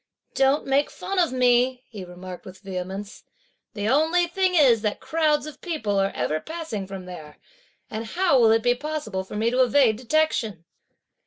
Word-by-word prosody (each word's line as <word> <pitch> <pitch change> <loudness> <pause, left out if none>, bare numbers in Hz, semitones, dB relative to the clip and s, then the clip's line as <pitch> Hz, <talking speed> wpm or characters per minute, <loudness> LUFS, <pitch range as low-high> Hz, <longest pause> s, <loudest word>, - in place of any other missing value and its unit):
"Don't 270 +2 +2
make 275 +2 +2
fun 390 -1 -4
of 340 -5 +2
me!" 250 0 +2
he 205 -5 -9
remarked 180 0 -10
with 185 0 -12
vehemence. 195 +1 -6 0.5
"The 205 0 -2
only 320 +7 +3
thing 370 +1 0
is 255 -9 +5
that 210 -1 -2
crowds 305 -2 +1
of 305 - -10
people 225 - -1
are 195 0 +2
ever 150 +6 -1
passing 315 - -6
from 190 -1 -8
there, 155 -5 -10 0.5
and 220 0 -5
how 340 0 +2
will 230 -2 +5
it 225 0 +3
be 245 0 +4
possible 245 -8 -4
for 190 - -10
me 225 +2 +1
to 255 +1 +2
evade 250 -3 +4
detection?" 235 - 0
240 Hz, 175 wpm, -24 LUFS, 195-300 Hz, 0.5 s, is